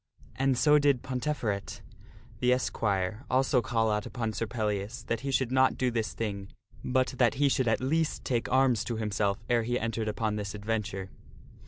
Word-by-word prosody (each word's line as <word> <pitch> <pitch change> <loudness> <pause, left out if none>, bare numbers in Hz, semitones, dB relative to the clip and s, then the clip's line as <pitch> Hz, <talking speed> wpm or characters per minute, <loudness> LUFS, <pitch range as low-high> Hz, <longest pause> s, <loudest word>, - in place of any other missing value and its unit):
And 135 -1 +1
so 150 +3 +5
did 140 -4 +2
Ponteferet, 125 -6 -3 0.6
the 125 - +3
esquire, 105 -4 0
also 130 0 +3
call 115 -3 +1
out 105 0 -1
upon 115 -3 -3
Sir 115 - -2
Pellias, 105 +1 -3
that 115 - -1
he 140 - -4
should 130 -2 +1
not 130 0 +3
do 125 -1 +1
this 115 -2 -2
thing, 100 -3 -3 0.4
but 130 +1 +1
that 120 -3 +4
he 145 +1 +3
should 130 -2 +1
at 110 - +2
least 155 +4 0
take 120 -3 -1
arms 130 -4 +3
to 120 - -2
himself 105 -1 -1
ere 120 -1 +3
he 120 +2 -1
entered 115 -1 -2
upon 105 0 -1
this 100 0 -4
adventure. 105 -3 -3
115 Hz, 180 wpm, -29 LUFS, 105-130 Hz, 0.6 s, so